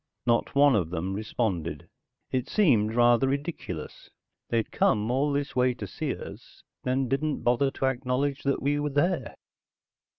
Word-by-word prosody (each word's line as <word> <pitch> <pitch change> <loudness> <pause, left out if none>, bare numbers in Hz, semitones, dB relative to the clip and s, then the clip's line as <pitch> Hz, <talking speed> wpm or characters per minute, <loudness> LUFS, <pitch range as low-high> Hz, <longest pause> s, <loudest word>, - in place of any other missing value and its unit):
Not 120 +2 +1
one 140 -2 +6
of 90 -6 0
them 90 +2 -3
responded. 95 -7 -3 0.4
It 130 0 -1
seemed 115 - +3
rather 120 +2 +4
ridiculous. 140 - -5 0.4
They'd 115 -2 0
come 105 +2 +2
all 140 +3 +1
this 140 0 -2
way 125 -1 +2
to 110 - -6
see - - -3
us, - - -11 0.2
then 130 +1 0
didn't 140 +4 -1
bother 125 +3 +3
to 135 - -3
acknowledge 130 +2 -1
that 140 -1 -1
we 145 +1 +1
were 150 0 -1
there. 145 0 0
125 Hz, 155 wpm, -27 LUFS, 110-140 Hz, 0.4 s, one